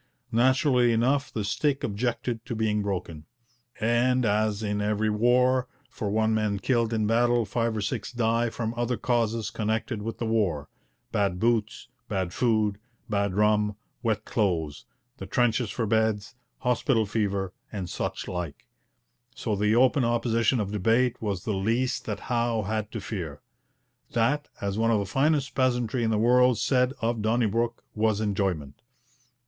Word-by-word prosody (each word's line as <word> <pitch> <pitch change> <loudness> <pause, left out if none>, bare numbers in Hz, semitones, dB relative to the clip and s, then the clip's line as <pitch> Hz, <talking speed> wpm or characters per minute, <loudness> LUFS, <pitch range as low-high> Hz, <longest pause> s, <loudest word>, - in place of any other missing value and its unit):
Naturally 125 +1 +3
enough, 130 +5 +1
the 110 - -3
stick 140 +7 0
objected 115 +1 -2
to 120 - -3
being 110 -1 +1
broken. 90 -6 -4 0.5
And 120 +2 +2
as 105 0 +1
in 105 -1 -1
every 105 +1 +1
war, 125 +3 +3 0.2
for 105 - -3
one 110 +1 +2
man 105 -2 0
killed 115 +1 +1
in 110 -2 0
battle 120 +1 +3
five 115 +2 -1
or - - -1
six 105 +1 -3
die 115 0 +1
from 115 0 -3
other 120 0 -1
causes 115 -2 0
connected 110 +1 -2
with 115 +1 -4
the 115 - -3
war 100 -10 0 0.4
bad 100 -3 0
boots, 115 0 0 0.2
bad 95 -4 -2
food, 110 -4 +1 0.3
bad 100 -2 0
rum, 105 0 +2 0.3
wet 115 -4 -1
clothes, 85 -9 -1 0.3
the - - -7
trenches 120 -2 +1
for 115 - -2
beds, 110 -1 0 0.3
hospital 125 -2 +2
fever, 100 -3 -1 0.2
and 95 -4 -4
such - - -4
like 90 -5 -5 0.7
so 110 -3 -2
the 105 +2 +2
open 130 +2 +4
opposition 115 0 +1
of 100 -2 -2
debate 115 +5 +1
was 100 -4 -2
the 110 - -1
least 115 +6 0
that 105 -2 -4
Howe 120 -2 0
had 110 +1 -3
to 115 - -4
fear. 85 -8 -5 0.7
That, 130 +6 +1
as 100 +1 -2
one 115 0 +2
of 115 - +3
the 100 - -1
finest 135 +5 +1
peasantry 125 -2 +1
in 110 - +1
the 110 - +1
world 125 +2 +4
said 125 -1 +2
of 115 -1 0
Donnybrook, 115 +1 0
'was 110 -1 +1
enjoyment.' 95 -9 -2
110 Hz, 155 wpm, -27 LUFS, 105-120 Hz, 0.7 s, open